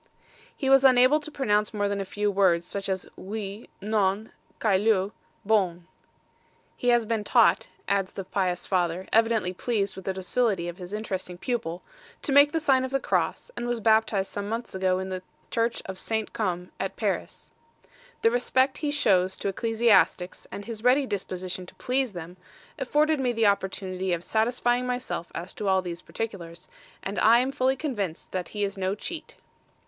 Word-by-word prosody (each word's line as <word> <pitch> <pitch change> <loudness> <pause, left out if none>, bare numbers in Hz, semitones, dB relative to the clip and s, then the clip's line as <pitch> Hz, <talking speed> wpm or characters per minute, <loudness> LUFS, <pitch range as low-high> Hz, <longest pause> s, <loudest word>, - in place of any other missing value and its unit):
He 270 - -2
was 270 0 +6
unable 255 +3 +6
to 305 - -7
pronounce 210 -7 0
more 205 -1 +1
than 200 0 -1
a - - -3
few 205 +2 -1
words, 185 -4 +3
such 200 -1 -4
as 190 -1 -2
Oui, 205 +1 -6
Non, 205 0 0 0.3
Caillou, 200 -1 +2 0.3
Bon. 185 -5 +1 0.9
"He 245 - -4
has 240 -2 +4
been 220 -1 -1
taught," - - +4 0.2
adds 195 -2 0
the 195 - -5
pious 185 -1 -1
father, 180 -1 0
evidently 225 -4 +3
pleased 200 -1 -1
with 190 - -9
the 190 - -1
docility 190 -1 0
of 175 0 -6
his 180 0 -9
interesting 190 -4 -4
pupil, 180 -6 -3 0.4
"to - - 0
make 285 +1 +7
the 325 - 0
sign 270 -4 +3
of 260 - -2
the 275 +1 0
cross, - - -1
and 240 - -3
was 240 -1 -1
baptized 220 -3 +2
some 205 0 -4
months 230 +2 -4
ago 185 -1 +1
in 190 0 -4
the 185 -1 -4 0.3
church 230 0 0
of 190 -1 -6
St. 220 -1 -2
Come, 180 -4 -2
at - - -3
Paris. - - -3 0.7
THE 230 - +5
RESPECT 260 +2 +2
HE 300 - -1
SHOWS 190 -10 +2
TO - - -2
ECCLESIASTICS 210 -4 +2
AND 200 - -7
HIS 225 -2 -7
READY 260 +3 +4
DISPOSITION 185 -4 -4
TO - - -14
PLEASE 255 -3 -1
THEM, 175 +1 -8 0.4
afforded 300 +3 +2
me 250 -2 +1
the 225 -1 +2
opportunity 190 -2 0
of 170 0 -2
satisfying 240 +3 +1
myself 250 -8 -3
as 175 +2 -5
to 210 - -4
all 190 -1 +3
these 175 -1 -5
particulars; 180 -6 -6 0.4
and 195 +1 -3
I 225 +2 +6
AM 260 +2 -1
FULLY 265 -1 +1
CONVINCED 210 - -4
THAT 185 -2 -3
HE 205 -1 -3
IS 200 0 -2
NO 190 +1 0
CHEAT." 330 - -7
205 Hz, 180 wpm, -27 LUFS, 185-240 Hz, 0.9 s, make